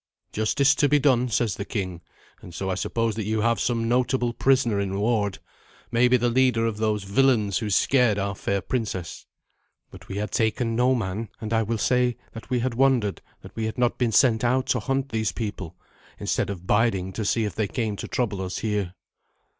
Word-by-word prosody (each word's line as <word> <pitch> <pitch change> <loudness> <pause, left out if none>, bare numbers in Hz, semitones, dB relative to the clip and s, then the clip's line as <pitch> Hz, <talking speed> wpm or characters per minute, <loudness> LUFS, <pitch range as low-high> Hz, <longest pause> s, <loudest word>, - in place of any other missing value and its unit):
'Justice 135 +6 +2
to 145 +1 +2
be 150 - +5
done,' 130 -3 +2
says 110 -1 0
the - - -3
king, 95 -5 -4 0.4
and 85 - -11
so 95 +2 -2
I - - 0
suppose 115 +4 -1
that 110 -1 -4
you 110 +1 0
have 115 +1 +1
some 115 -2 0
notable 125 0 +1
prisoner 125 -5 +2
in 100 0 -2
ward 105 -3 0 0.5
maybe 125 +2 +4
the 120 0 0
leader 125 -2 +2
of 115 -2 -2
those 105 -2 0
villains 105 -2 +2
who 110 - -3
scared 120 +2 +3
our 100 0 -1
fair 100 0 -2
princess." 100 -6 -4 0.6
"But - - -13
we 95 - -5
had 105 -1 -3
taken 115 +1 0
no 125 +2 +3
man, 105 -1 -3
and 110 0 -4
I 115 - +3
will 115 +1 -1
say 125 +1 +1
that 115 - -10
we 125 -2 0
had 130 0 -1
wondered 125 -5 +2 0.2
that - - -13
we 110 - -2
had 110 - -4
not 125 0 +1
been 120 -3 +1
sent 115 -1 +4
out 130 +2 +2
to 125 - +2
hunt 135 +4 -2
those 110 -3 -1
people, 95 -5 -5 0.4
instead - - -1
of 90 -3 -6
biding 100 -3 +1
to 110 - -3
see 115 +2 +1
if 105 - -4
they 110 -2 -1
came 105 +5 -2
to - - -6
trouble 110 -7 -2
us 95 0 -4
here." 105 -4 -2
115 Hz, 205 wpm, -25 LUFS, 100-125 Hz, 0.6 s, be